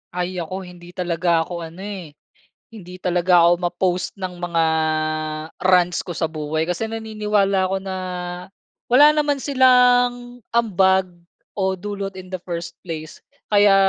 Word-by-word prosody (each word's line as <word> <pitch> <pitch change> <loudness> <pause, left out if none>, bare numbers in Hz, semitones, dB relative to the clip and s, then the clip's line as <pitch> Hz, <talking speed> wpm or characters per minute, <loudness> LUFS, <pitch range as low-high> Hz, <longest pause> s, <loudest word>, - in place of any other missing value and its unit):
Ay, 180 0 -2
ako 185 +3 -5
hindi 175 -1 -13
talaga 170 -2 +1
ako 175 +1 -6
ano, 170 +4 -11
eh, 185 -7 -7 0.6
hindi 180 -5 -10
talaga 180 -1 +3
ako 175 +1 +4
ma-post 180 +1 -1
ng 185 -3 -6
mga 170 -2 0 1.0
rants 180 -1 +3
ko 175 - -6
sa 160 0 -1
buhay 155 0 -2
kasi 180 +6 -2
naniniwala 210 -3 0
ako 190 +1 -1
na, 190 -1 -4 0.9
wala 255 +4 +7
naman 295 -1 +1
silang, 245 -2 +3 0.2
ambag, 190 -4 +3 0.4
o 190 -1 0
dulot 195 0 -5
in 185 0 -10
the 185 - -2
first 170 -2 -5
place. 155 -3 -7 0.3
Kaya 205 -1 +6
185 Hz, 140 wpm, -21 LUFS, 175-210 Hz, 1.0 s, wala